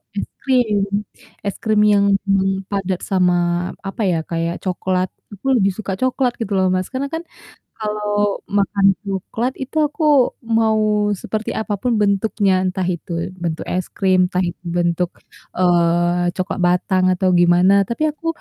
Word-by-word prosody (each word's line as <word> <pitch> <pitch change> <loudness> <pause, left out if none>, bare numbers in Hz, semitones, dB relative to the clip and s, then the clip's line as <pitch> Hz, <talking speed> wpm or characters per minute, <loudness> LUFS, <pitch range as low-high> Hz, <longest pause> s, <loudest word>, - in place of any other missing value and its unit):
es - - -2
krim, 240 -7 +2 0.6
es 200 - -2
krim 215 -1 +3
yang 200 0 +4 0.3
belum 195 0 +2 0.2
padat 195 -2 -2
sama 180 -2 +3 0.5
apa 195 - -5
ya, 165 - +1
kayak 165 +1 -1
coklat, 185 0 -1 0.2
aku 205 +5 -13
lebih 195 -2 +2
suka 200 -3 -4
coklat 255 -1 +1
gitu 210 -2 -3
loh 190 - +3
Mas, 185 0 -1
karena 270 +2 -2
kan 325 +1 -3 0.6
kalau 210 -1 -1 0.2
makan 200 0 +2 0.2
coklat 205 +5 -3
itu 275 +4 -7
aku 295 +3 -7 0.6
mau 220 -1 +3 0.4
seperti 215 0 -3
apa 210 -1 -2
pun 250 -1 +1
bentuknya, 200 0 +2
entah 185 0 -1
itu 170 - -12 0.3
bentuk 165 -2 -3
es 185 -1 -1
krim, 190 -2 +2
entah 180 - -2
itu 175 - -9
bentuk, 175 0 +1 0.5
eee, 175 0 +2
coklat 185 +1 -3
batang 185 +1 +2
atau 185 +1 +1
gimana, 175 +2 +5 0.2
tapi 235 +6 -3
aku 330 +2 -12
195 Hz, 150 wpm, -19 LUFS, 180-215 Hz, 0.6 s, gimana